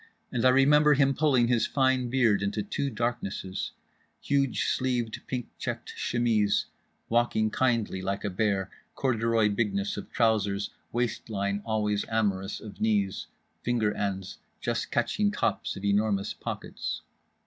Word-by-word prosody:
And 120 - -1
I - - +8
remember 145 +3 +5
him 135 -1 +4
pulling 135 -5 +3
his 120 -2 +2
fine 130 -2 +2
beard 120 -6 +3
into 100 +1 -1
two 140 +7 -2
darknesses—huge 120 +4 -3
sleeved, 125 -3 -1
pink 125 -3 -3
checked - - -4
chemise—walking 115 0 0
kindly 115 -7 +1
like 100 +1 -2
a 100 - -1
bear—corduroy 110 +3 0
bigness 100 -1 -1
of - - -7
trousers, 105 -3 +1 0.2
waistline 105 -4 -1
always 105 -2 0
amorous 100 -3 0
of 105 -2 -10
knees—finger 105 +2 -1
ends 95 -2 -3 0.2
just - - -2
catching 205 0 +1
tops 115 - -1
of 100 - -6
enormous 100 -1 +1
pockets. - - -5
110 Hz, 115 wpm, -28 LUFS, 100-125 Hz, 0.2 s, I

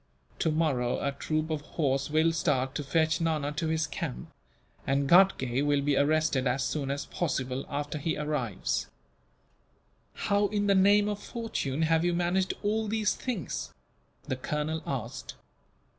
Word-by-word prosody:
Tomorrow 150 -6 +1
a - - +1
troop 155 +3 -2
of 155 -2 -1
horse 140 -3 -1
will 160 +2 +3
start, 135 -5 0
to 145 - -3
fetch 160 +3 +1
Nana 155 -3 0
to 155 +2 -2
his 160 0 +1
camp; 60 - -5 0.6
and 140 +1 +1
Ghatgay 140 -8 +4
will 145 -1 +2
be 145 0 +2
arrested 145 -2 +2
as 130 +2 +1
soon 140 -3 -2
as 140 +1 -2
possible, 135 -5 -2
after 145 +1 -3
he 160 +3 -1
arrives." 150 -9 -2 1.3
"How 205 0 +1
in 205 0 -1
the 200 - +4
name 200 +2 +5
of 205 -1 -3
fortune 160 - -3
have 160 0 +3
you 175 0 +1
managed 180 +2 +1
all 215 +1 0
these 215 0 +1
things?" 220 - -4 0.5
the 130 - -3
colonel 150 +4 -2
asked. 125 -2 -4
155 Hz, 150 wpm, -29 LUFS, 140-175 Hz, 1.3 s, name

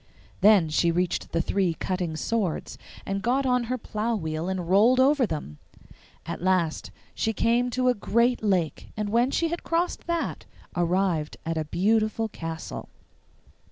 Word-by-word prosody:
Then 200 -5 +5
she 170 +2 +2
reached 175 +1 -1
the 165 - +1
three 185 -3 0
cutting 180 -3 -2
swords, 205 -3 -2 0.3
and 195 0 -2
got 255 +5 +1
on 250 -1 +2
her 255 +2 -2
plough 225 0 -2
wheel 160 -2 -3
and 185 -3 -3
rolled 220 +8 +5
over 270 -1 +4
them. 145 - -6 0.7
At - - -5
last 180 -3 +1 0.2
she 225 - -1
came 235 +3 +2
to 255 +1 0
a 250 - +5
great 235 +3 +1
lake, 185 -7 0
and, 210 -1 -2
when 235 +4 +3
she 330 +4 0
had 340 +1 -3
crossed 340 +1 -1
that, 340 -1 -2 0.3
arrived 175 -3 0
at 165 0 -1
a 160 -1 -1
beautiful 215 +6 +1
castle. 165 -4 -6
200 Hz, 155 wpm, -26 LUFS, 170-240 Hz, 0.7 s, Then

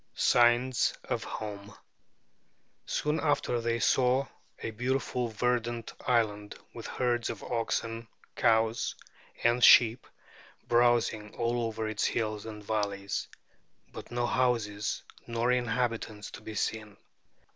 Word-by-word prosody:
SIGNS 120 +1 +3
OF - - -2
HOME 105 -1 -6 1.1
Soon 150 +1 0
after 145 -5 +1
they 115 0 0
saw 130 +3 +3 0.3
a - - -5
beautiful 125 +1 -1
verdant 120 +1 -1
island, 105 -4 +1 0.2
with 115 - -7
herds 120 -2 0
of - - -6
oxen, 115 -1 -2 0.3
cows, 115 0 +2 0.5
and 120 +1 +3
sheep 120 0 +7 0.6
browsing 120 -3 +2
all 120 0 0
over 110 0 -3
its 110 -1 -2
hills 110 -1 -1
and 105 -1 -8
valleys; 100 -2 -2 0.7
but - - -9
no 120 0 -1
houses 115 -5 0 0.2
nor 115 +1 0
inhabitants 115 -3 -1
to - - -10
be 110 - -8
seen. 110 -1 -3
115 Hz, 115 wpm, -30 LUFS, 110-120 Hz, 1.1 s, sheep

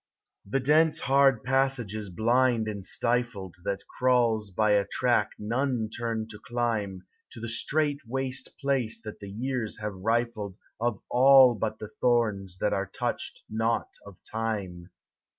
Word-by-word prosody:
The 120 +8 -1
dense, 155 +4 +3
hard 135 -2 +4
passage 135 -4 +1
is 105 -2 -5
blind 115 +3 +2
and 100 -2 -4
stifled 115 -4 -1
That 100 0 -3
crawls 120 -4 +2
by 105 +3 +1
a 100 -1 +3
track 120 -2 +1
none 120 +1 -1
turn 115 -2 -2
to 105 -1 -9
climb 105 -6 -2 0.3
To - - -8
the 115 - -5
strait 145 +5 0
waste 130 +1 -3
place 135 -6 0
that 110 -2 -8
the 100 - -8
years 120 +1 -3
have 105 -1 -4
rifled 110 0 -1 0.2
Of 115 -2 -1
all 130 0 +7
but 110 -1 -3
the 105 0 -8
thorns 105 -7 +1
that - - 0
are - - -1
touched - - -4
not 115 +1 -1
of 100 -3 -13
Time. 100 -6 -4
115 Hz, 150 wpm, -27 LUFS, 105-125 Hz, 0.3 s, all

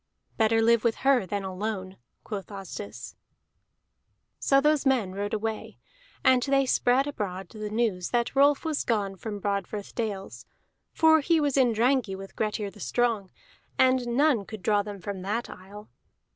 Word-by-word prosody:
"Better 225 0 +3
live 230 -1 +4
with 235 -2 +2
her 260 -8 +4
than 200 +1 -3
alone," 190 0 -4 0.3
quoth 205 -3 -6
Asdis. 200 +1 -8 1.2
So 275 - +4
those 300 0 +2
men 255 -9 +1
rode 205 +1 -3
away, 220 0 -4 0.5
and 255 -1 +5
they 275 +1 +2
spread 255 +1 +2
abroad 195 -10 -5
the 215 -1 -6
news 210 -5 -1
that 240 +1 0
Rolf 285 +2 +4
was 310 -2 -1
gone 205 -4 -1
from 205 +1 -6
Broadfirth 200 0 -3
dales, 195 - -5 0.4
for 320 0 +5
he 325 +2 +2
was 290 -3 +1
in 255 -3 +4
Drangey 235 -2 +1
with 195 0 -10
Grettir 210 -2 -2
the 210 - -16
Strong, 225 -2 0 0.5
and 255 -1 +3
none 250 -2 +2
could 215 -3 -9
draw 205 -1 +3
them 205 -1 -7
from 200 -1 -5
that 210 +5 -3
isle. 205 +3 -12
220 Hz, 160 wpm, -27 LUFS, 200-255 Hz, 1.2 s, and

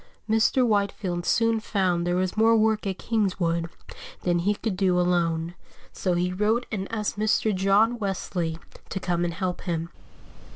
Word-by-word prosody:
Mr. 225 +3 +3
Whitefield 200 -5 -1
soon 230 -1 +2
found 185 -5 0
there 175 - +1
was 185 0 -1
more 225 +1 +4
work 220 -1 +1
at 190 -1 -2
Kingswood 180 -6 0 0.5
than 175 -1 +1
he 205 +4 +1
could 215 -1 -3
do 185 -2 +2
alone, 170 -2 +1 0.4
so 185 - -1
he 180 +1 0
wrote 215 +5 +1
and 195 -2 -4
asked 210 -2 -2
Mr. 215 0 +2
John 200 +5 +3
Wesley 180 -5 -2 0.3
to 190 - -3
come 175 -2 -1
and 170 -1 -2
help 185 -1 -3
him. 170 -2 -3
190 Hz, 160 wpm, -25 LUFS, 175-215 Hz, 0.5 s, more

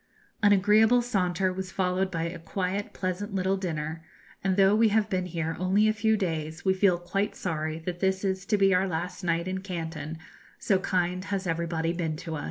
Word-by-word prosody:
An 205 -1 +5
agreeable 215 +5 +5
saunter 185 -5 0
was 185 0 -5
followed 185 0 0
by 165 -3 -2
a 170 +1 -4
quiet, 190 +4 -3
pleasant 195 +2 -3
little 190 0 +1
dinner, 160 -4 -4 0.4
and 190 -1 +1
though 195 +1 +5
we 225 +1 +5
have 215 0 +1
been 185 -1 0
here 165 -2 -3
only 190 +4 +3
a 215 - +3
few 220 0 +2
days 160 -4 -3
we 190 - +4
feel 190 -2 +3
quite 195 +4 -2
sorry 155 -3 -3
that 175 +2 -5
this 190 0 +1
is 190 -1 -1
to 210 - +2
be 195 -1 +4
our 185 +1 +3
last 175 +2 -4
night 170 0 0
in 190 0 -2
Canton, 165 -5 -5 0.4
so 195 -2 +1
kind 180 -1 -1
has 195 -1 -2
everybody 165 -1 -1
been 165 -3 -2
to 160 +1 -6
us. - - -4
185 Hz, 200 wpm, -27 LUFS, 170-195 Hz, 0.4 s, An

